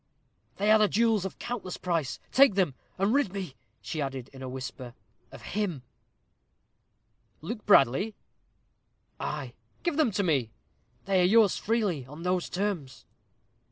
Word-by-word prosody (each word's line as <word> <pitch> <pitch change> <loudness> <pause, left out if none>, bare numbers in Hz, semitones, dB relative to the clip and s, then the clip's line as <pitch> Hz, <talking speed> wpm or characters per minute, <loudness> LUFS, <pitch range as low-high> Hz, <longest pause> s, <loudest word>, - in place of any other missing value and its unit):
"They 210 +2 +2
are 215 -1 +6
jewels 220 -2 +2
of 190 - -5
countless 225 -7 -5
price. 165 -7 -2
Take 270 -6 +6
them, 180 -8 +2 0.2
and 195 +4 +2
rid 280 -8 +2
me," 190 -7 -5 0.3
she 150 +8 -4
added 135 -2 -4
in 135 - -11
a 130 - -5
whisper, 130 -1 -7 0.4
"of - - -12
him." 185 -10 -2 1.6
"Luke 215 +7 -6
Bradley?" 195 - +4 1.0
"Ay." - - -4 0.3
"Give 345 -4 0
them 310 -6 +4
to 200 - +1
me." 140 - +1 0.6
"They 190 -1 +3
are - - +4
yours 210 +1 +5
freely 200 - 0
on 150 +5 -10
those 180 0 0
terms." 180 -9 -3
185 Hz, 140 wpm, -28 LUFS, 140-215 Hz, 1.6 s, are